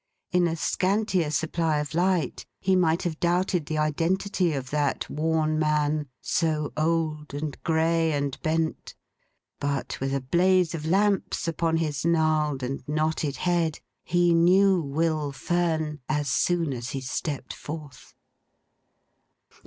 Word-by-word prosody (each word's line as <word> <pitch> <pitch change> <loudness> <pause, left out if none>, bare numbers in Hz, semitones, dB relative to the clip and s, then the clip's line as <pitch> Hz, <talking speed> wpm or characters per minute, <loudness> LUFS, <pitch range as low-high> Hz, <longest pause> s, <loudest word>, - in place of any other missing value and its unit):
In 180 -1 +3
a 165 - -1
scantier 185 -1 0
supply 160 +1 0
of 150 +1 -3
light, 175 -4 +1 0.2
he 190 0 +2
might 170 -1 +2
have 165 -3 -3
doubted 175 -2 +1
the 155 - -2
identity 170 +4 +1
of 130 -2 -4
that 145 -2 0
worn 155 0 0
man, 150 -1 +1
so 150 +5 -1
old, 155 -2 -1
and 145 -1 -3
grey, 165 0 +2
and 140 -2 -1
bent; 160 -1 -1 0.6
but 140 -1 -2
with 135 0 -2
a - - +1
blaze 175 +6 +2
of 155 -1 -4
lamps 195 0 +1
upon 165 0 0
his 150 -4 -2
gnarled 155 -4 +1
and 135 +2 -3
knotted 155 -1 0
head, 170 -3 0 0.2
he 175 0 +3
knew 185 +2 +5
Will 155 0 -1
Fern 160 -1 -1
as 150 -1 0
soon 165 +1 +1
as 120 0 -5
he - - -4
stepped 130 +1 -4
forth. 150 -4 -9
160 Hz, 135 wpm, -26 LUFS, 150-170 Hz, 0.6 s, knew